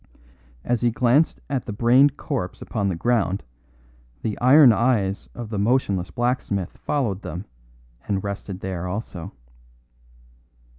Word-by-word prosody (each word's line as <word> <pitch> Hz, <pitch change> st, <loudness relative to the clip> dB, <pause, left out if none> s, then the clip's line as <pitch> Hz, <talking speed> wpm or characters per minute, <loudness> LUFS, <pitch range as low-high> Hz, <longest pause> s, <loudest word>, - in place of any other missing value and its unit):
As 120 Hz, -2 st, 0 dB
he 120 Hz, -, +3 dB
glanced 125 Hz, +6 st, +2 dB
at 135 Hz, -3 st, -3 dB
the -, -, -3 dB
brained 125 Hz, +6 st, +4 dB
corpse 125 Hz, -11 st, -4 dB
upon 100 Hz, -3 st, -2 dB
the 90 Hz, -, -1 dB
ground 100 Hz, -1 st, 0 dB, 0.8 s
the 110 Hz, -2 st, -1 dB
iron 130 Hz, 0 st, +7 dB
eyes 110 Hz, -5 st, 0 dB
of 115 Hz, -2 st, -7 dB
the 105 Hz, -, -2 dB
motionless 100 Hz, -5 st, +1 dB
blacksmith 120 Hz, -6 st, -2 dB
followed 115 Hz, -10 st, -2 dB
them 90 Hz, +2 st, -6 dB, 0.6 s
and 95 Hz, -2 st, -1 dB
rested 100 Hz, -1 st, -5 dB
there 90 Hz, -2 st, -4 dB
also. 90 Hz, -3 st, -5 dB
110 Hz, 130 wpm, -23 LUFS, 95-125 Hz, 0.8 s, iron